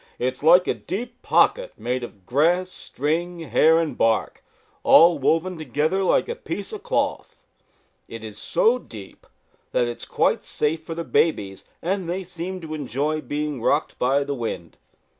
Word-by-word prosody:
"It 130 +1 0
is - - -13
like 175 +4 +6
a - - +2
deep 240 +5 -6
pocket - - +2
made 125 0 -2
of 100 -5 -10
grass, 175 - +2
string, 170 +5 -3
hair 160 +3 +4
and 165 -2 -1
bark, 115 -1 0 0.4
all 170 -1 +6
woven 165 +5 +1
together 155 +6 0
like 185 - +2
a 470 - -2
piece 465 - -6
of 425 - -6
cloth. 485 +3 -2 0.7
It 115 -1 -9
is 105 -1 -9
so 235 - +2
deep 105 - -12 0.5
that - - +3
it 120 - -3
is - - -9
quite - - +1
safe 155 +2 -1
for 165 - -6
the 170 - -3
babies, 100 - 0 0.2
and 185 0 -1
they 185 +2 -2
seem 180 +1 -6
to 160 -1 -7
enjoy 150 +2 -2
being 145 -1 -3
rocked 145 +6 0
by 135 +3 +2
the 140 0 -3
wind. 115 -9 -5
155 Hz, 170 wpm, -23 LUFS, 130-180 Hz, 0.7 s, like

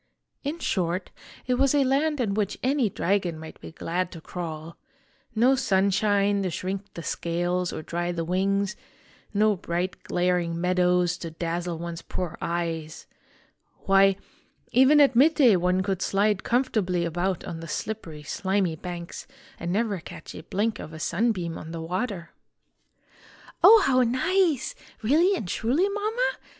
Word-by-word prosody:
In 295 +3 -3
short, 180 - -1 0.3
it 250 0 0
was 275 +1 +3
a 285 - +4
land 285 +3 +1
in 220 -5 0
which 210 -1 -1
any 260 -3 +2
dragon 185 -3 0
might 160 0 -11
be - - -9
glad 175 +2 -2
to 165 - -8
crawl: 165 -1 -6 0.6
no 245 +4 +5
sunshine 200 -3 +2
to 190 - -1
shrink 195 +3 -4
the 170 - -6
scales 175 +2 -1
or - - -6
dry 175 +2 -2
the 165 -1 -3
wings, 195 +3 0 0.6
no 215 0 +3
bright 175 +1 -3
glaring 175 -2 0
meadows 180 0 +2
to 170 - -5
dazzle 170 +1 -3
one's 170 0 -6
poor 180 -4 -4
eyes. 165 -2 -3 0.8
Why, 195 0 +5 0.6
even 265 +5 +6
at 280 -3 +5
mid 300 +6 +5
day 250 -9 +6
one 180 +1 +1
could 190 -1 -2
slide 200 0 +1
comfortably 215 -9 +1
about 175 +3 -1
on 170 -2 -6
the 165 - -8
slippery, 165 -3 -5
slimy 190 +2 0
banks 170 +1 -7 0.3
and 170 - -3
never 205 -1 0
catch - - -10
a - - -8
blink 205 +6 -1
of 160 - -8
a 160 - -8
sunbeam 175 -1 -1
on 160 - -9
the 165 - -5
water." 180 +1 -3 1.3
"Oh, 445 -1 +9
how 255 -1 +4
nice! 300 +5 +1 0.3
Really 330 - +4
and 210 - -4
truly, 255 - +1
Mama?" 430 +5 0
190 Hz, 150 wpm, -26 LUFS, 170-235 Hz, 1.3 s, Oh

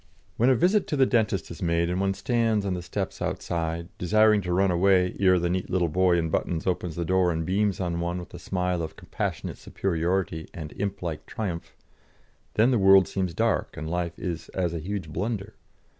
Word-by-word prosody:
When 120 +3 +3
a 130 - +5
visit 190 - +3
to - - -1
the 135 - +5
dentist 110 -8 0
is 85 - -9
made, 85 -1 +1
and 90 +2 -1
one 95 0 +1
stands 110 -1 +1
on 95 - 0
the 90 - -3
steps 90 - -4
outside, 85 0 -2
desiring 110 +3 +4
to 90 -1 -4
run 95 +1 +3
away 90 +1 +3
ere 95 -2 +5
the 85 0 0
neat 90 +1 -2
little 90 -2 +1
boy 90 +2 +3
in 80 -1 -1
buttons 80 0 -1
opens 90 -3 -1
the 85 - -2
door 95 0 +3
and 80 -1 -2
beams 100 +2 +1
on 85 -2 -1
one 85 +1 -2
with 90 - -8
a - - -8
smile 90 -1 -1
of 80 -1 -5
compassionate - - -4
superiority 85 -2 -1
and 75 -3 -6
implike 95 -5 -4
triumph, 90 -6 -5 0.8
then 115 +4 +4
the 120 - +3
world 95 -1 +7
seems 95 -4 -2
dark 115 +2 0
and 80 +1 -4
life 90 0 -2
is 85 -2 -5
as 90 -3 0
a 85 - -3
huge 95 +1 -4
blunder. 105 +2 -3
90 Hz, 205 wpm, -26 LUFS, 85-100 Hz, 0.8 s, world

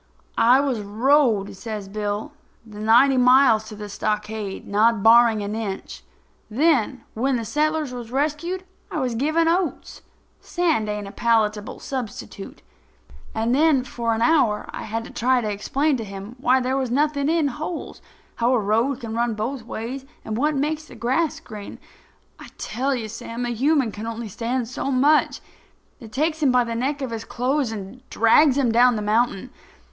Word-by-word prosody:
"I 245 +3 +5
was 270 -5 -1
rode," 220 0 +2
says 210 -1 -6
Bill, 210 +5 -3 0.3
"the 210 -2 -11
ninety 240 +5 +5
miles 250 -3 +5
to 215 - -9
the 210 0 -7
stockade, 210 -1 -3
not 215 +1 +2
barring 225 -2 +6
an 205 +1 -4
inch. 215 -3 -5 0.5
Then, 260 -1 +1
when 260 +4 0
the 230 -2 -2
settlers 305 +1 0
was 240 -2 -7
rescued, 310 +7 -1 0.3
I 315 - -3
was 255 -3 -1
given 310 +7 +1
oats. 345 +1 -1 0.4
Sand 320 -12 0
ain't 210 -1 -4
a - - -8
palatable 215 -2 0
substitute. 225 -6 -7 0.7
And 225 +2 0
then, 290 -2 +3
for 235 -2 -2
an 225 - 0
hour 235 -9 +3
I - - -6
had 225 +1 -3
to - - -10
try 255 +2 +2
to 215 -3 -2
explain 275 +8 0
to 230 - -4
him 200 +2 -8
why 260 +1 +3
there 255 +1 -1
was 260 -2 -1
nothin' 285 +2 +1
in 320 -3 +2
holes, 310 +5 -6 0.4
how 240 +2 +2
a - - +2
road 225 +6 0
can 225 -2 -5
run 235 -1 0
both 235 +4 -3
ways 255 +5 -6 0.2
and 215 - -3
what 295 +6 +1
makes 305 +3 -1
the - - -13
grass 290 +7 0
green. 215 -10 -9 0.6
I - - -10
tell 265 +5 -2
you, 230 -3 -4
Sam, 230 +2 -6
a - - -2
human 265 +1 +1
can 215 +2 -7
only 230 -1 -5
stand 235 +4 -2
so 260 +3 -4
much. 280 +4 +3 0.6
I 230 - -9
takes 310 +7 -1
him 280 -4 +4
by 250 0 +4
the 235 -1 -4
neck 270 +5 -2
of 255 - -4
his 225 -1 -4
clothes 255 +1 -1
and 210 +3 -8
drags 260 +5 +4
him 255 -5 +2
down 245 +1 +5
the 210 - -3
mountain. 215 -1 0
240 Hz, 175 wpm, -23 LUFS, 220-275 Hz, 0.7 s, barring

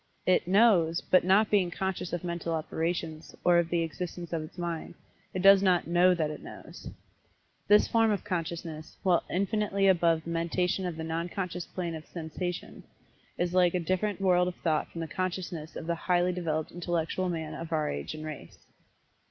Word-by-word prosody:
It 185 -1 +3
"knows," 185 -5 +4
but 185 - +3
not 195 +4 +4
being 195 -4 +3
conscious 190 0 -3
of 175 -1 -3
mental 170 -1 -2
operations, 160 0 -3
or 175 -1 +5
of 170 -1 0
the 170 -1 +1
existence 175 +1 -5
of 165 - 0
its 155 +3 -10
mind, 170 -1 -4 0.4
it 185 - -3
does 195 0 +8
not 185 -3 +3
"know 175 +2 +4
that 155 -3 -1
it 150 - -8
knows." - - -10 0.8
This 210 +1 +6
form 225 -1 +3
of 205 -2 0
consciousness, 165 -4 -5
while 180 -3 +3
infinitely 200 0 +1
above 170 -3 +3
the 170 - -6
mentation 180 +3 0
of 170 -3 -5
the 160 - -4
nonconscious 175 +2 -3
plane 175 -2 -4
of 160 -1 -8
"sansation," 175 +2 -5 0.6
is 175 0 -1
like 180 -1 +4
a - - +2
different 185 +4 -1
world 180 -2 +3
of 180 - -3
thought 155 -3 0
from 165 - -6
the 165 - -3
consciousness 175 -3 -4
of - - -6
the 170 - 0
highly 175 +1 +1
developed 160 -3 -2
intellectual 175 +1 -2
man 160 -2 -4
of 165 +1 -7
our 155 -2 +1
age 70 - -4
and 155 0 -7
race. 150 - -8
175 Hz, 185 wpm, -29 LUFS, 165-185 Hz, 0.8 s, does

